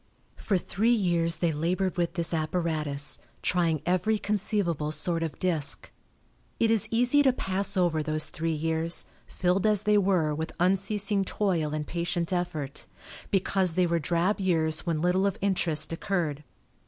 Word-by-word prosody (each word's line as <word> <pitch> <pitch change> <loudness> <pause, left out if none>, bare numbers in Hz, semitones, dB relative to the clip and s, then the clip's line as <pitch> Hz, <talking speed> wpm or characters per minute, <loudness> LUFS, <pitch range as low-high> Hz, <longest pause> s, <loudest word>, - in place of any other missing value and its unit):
For 200 - 0
three 205 +5 -1
years 170 -5 +1
they 170 0 +1
labored 180 +5 -1
with 175 -2 -1
this 170 -1 0
apparatus, 155 -3 0 0.2
trying 165 -4 +1
every 185 +5 +1
conceivable 200 -7 -1
sort 165 +2 -1
of 165 -2 -3
disk. 160 -6 -1 0.7
It 225 -1 +3
is 225 -4 +3
easy 245 +5 +3
to 270 -2 +4
pass 200 -3 -1
over 170 -4 +2
those 155 0 0
three 165 +1 -3
years, 160 +2 0 0.2
filled 185 +3 0
as 210 -1 +2
they 210 0 +4
were 180 -6 +1
with 160 +2 -4
unceasing 195 +2 +1
toil 180 -6 -1
and 150 -1 -3
patient 170 +1 -2
effort, 160 -6 -3 0.4
because 190 -3 +1
they 180 -1 +3
were 170 -1 +1
drab 175 +6 0
years 160 -4 +1
when 160 -2 0
little 185 +2 +2
of 195 - -2
interest 165 -5 +1
occurred. 165 -5 -2
175 Hz, 155 wpm, -27 LUFS, 160-195 Hz, 0.7 s, to